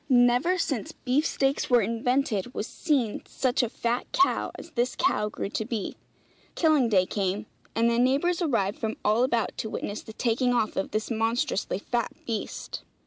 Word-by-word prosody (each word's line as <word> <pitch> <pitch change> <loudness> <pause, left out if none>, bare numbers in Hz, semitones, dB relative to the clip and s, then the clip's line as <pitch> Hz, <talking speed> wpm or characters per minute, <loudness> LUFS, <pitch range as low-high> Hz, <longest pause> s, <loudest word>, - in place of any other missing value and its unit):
Never, 250 +8 +4
since 275 - -2
beef 270 +4 +1
steaks 270 0 0
were 240 -3 +5
invented, 230 0 0
was - - -2
seen 270 -9 0
such 260 -1 +1
a 240 - 0
fat 235 +2 -2
cow 365 - +2
as - - -10
this 245 +1 0
cow 210 -12 +1
grew 205 - -4
to 220 - -2
be. 220 -2 -3 0.6
Killing 305 -7 +3
day 190 -4 +4
came, 195 +2 -1 0.3
and 230 +1 +3
the 235 0 +2
neighbours 285 +8 +2
arrived 230 - 0
from 220 0 -2
all 215 +4 +4
about 235 -3 0
to 220 - -2
witness 205 -1 -4
the 220 - -11
taking 245 +2 +1
off 220 -3 +1
of 190 - -1
this 215 +2 -2
monstrously 225 -3 0
fat 235 +3 -2
beast. 225 -3 -4
235 Hz, 175 wpm, -27 LUFS, 220-260 Hz, 0.6 s, were